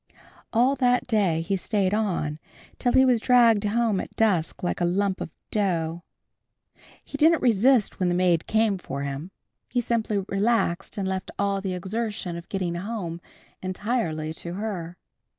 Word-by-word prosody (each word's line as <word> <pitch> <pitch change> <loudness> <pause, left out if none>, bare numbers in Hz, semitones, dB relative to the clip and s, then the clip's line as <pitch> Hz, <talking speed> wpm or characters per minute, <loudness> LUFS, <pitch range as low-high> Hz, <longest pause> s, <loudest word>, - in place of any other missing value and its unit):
All 245 +4 +3
that 250 -1 +2
day 195 -8 +1
he 195 +4 -1
stayed 195 0 0
on, 175 -8 -1 0.4
till 245 - +1
he 265 - +6
was 250 -3 +4
dragged 230 -3 +4
home 220 -1 +1
at - - -7
dusk 185 -9 +1
like 175 - -1
a - - +3
lump 190 +2 0
of - - -4 0.2
dough. 170 -5 0 1.0
He 285 - -7
didn't 325 +2 +4
resist 240 0 +3
when 180 -1 +2
the 175 - +1
maid 175 -2 +2
came 220 -3 +2
for 140 -5 -5
him. 140 +5 -5 0.4
He 245 - 0
simply 220 -4 -1
relaxed 195 -3 0
and 195 -2 -1
left 190 0 -3
all 200 -1 0
the 190 -2 -3
exertion 200 -1 -3
of 170 0 -9
getting 185 -3 -2
home 175 -2 -4 0.4
entirely 185 -5 -2
to 170 +2 -7
her. 185 -5 -4
195 Hz, 160 wpm, -25 LUFS, 175-225 Hz, 1.0 s, he